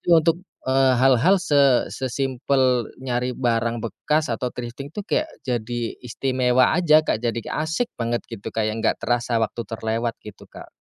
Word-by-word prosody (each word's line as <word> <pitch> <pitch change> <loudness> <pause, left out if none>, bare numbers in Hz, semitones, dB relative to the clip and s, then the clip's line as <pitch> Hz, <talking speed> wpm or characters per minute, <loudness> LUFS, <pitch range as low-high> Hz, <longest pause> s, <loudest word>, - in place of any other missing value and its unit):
Jadi - - -31
untuk, 165 +1 +3 0.3
eee, 130 0 +3
hal-hal 135 +9 +4
se 140 -7 +3
se-simple 130 -1 0 0.2
nyari 125 0 -1
barang 115 -2 0
bekas 150 +6 -1
atau 125 +2 -2
thrifting 125 +3 -7
tuh 205 - -4
kayak 310 +8 0 0.2
jadi 120 -1 -2 0.2
istimewa 125 0 +1
aja, 155 -2 +4
Kak, 110 - 0
jadi 120 -1 -1
asik 160 +11 -1
banget 120 0 -1
gitu 100 - -7
kayak 110 0 -1
nggak - - +2
terasa 120 0 0
waktu 110 - -3
terlewat 115 +1 -2
gitu, 105 -2 -12
Kak. - - -12
125 Hz, 155 wpm, -23 LUFS, 115-140 Hz, 0.3 s, hal-hal